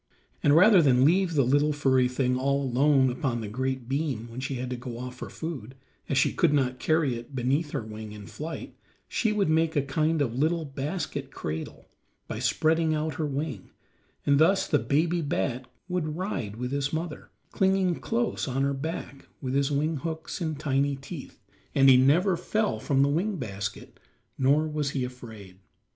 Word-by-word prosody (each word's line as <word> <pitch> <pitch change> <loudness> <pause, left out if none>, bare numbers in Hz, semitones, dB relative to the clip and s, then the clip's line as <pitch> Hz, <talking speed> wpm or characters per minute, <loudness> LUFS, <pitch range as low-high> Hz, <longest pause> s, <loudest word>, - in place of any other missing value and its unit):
And 145 - +4
rather 190 +2 +7
than 130 -3 +4
leave 175 +1 +3
the 140 - +4
little 145 +4 +3
furry 130 -3 +3
thing 125 0 0
all 140 +2 +1
alone 135 +1 +3
upon 125 -1 -2
the 110 - -5
great 130 +2 -3
beam 135 -4 -2
when 120 - -7
she 130 +1 -3
had 125 0 -4
to - - -1
go 120 -1 -7
off 125 +1 -6
for - - -7
food, 135 -7 -6 0.3
as 140 - +1
she 130 - +3
could 165 -4 +3
not 130 -2 0
carry 155 -5 +2
it 120 +4 -10
beneath 135 +5 0
her 140 -5 -3
wing 110 0 -8
in 105 -1 -9
flight, 160 +8 -7 0.3
she 220 - 0
would 210 -3 +1
make 160 +1 +2
a 145 - +3
kind 155 +3 0
of 130 -6 0
little 160 +2 +1
basket 145 0 -4
cradle 80 - -6 0.4
by - - -5
spreading 160 0 +2
out 155 0 -1
her 155 - -1
wing, 145 +1 -4 0.6
and 140 0 +4
thus 190 +5 +4
the 145 - +3
baby 170 +4 +1
bat 130 -4 -2 0.2
would 165 -4 -2
ride 180 - -3
with 125 +2 -4
his 140 0 -1
mother, 160 0 -4 0.2
clinging 190 -2 +2
close 235 0 -1
to 130 - -4
her 135 +1 +1
back 140 -1 -6
with 130 -2 -3
his 140 0 +2
wing 150 +2 0
hooks 160 +4 -5
and 155 -3 -2
tiny 140 -1 +1
teeth, 140 +2 -9 0.4
and 135 0 +6
he 130 - +9
never 165 +9 +4
fell 215 +5 -1
from 140 -2 +2
the - - +3
wing 180 +9 0
basket 100 -7 -6 0.4
nor 145 +4 +3
was 150 -2 -1
he 130 - 0
afraid. 110 -7 -9
140 Hz, 185 wpm, -27 LUFS, 130-160 Hz, 0.6 s, he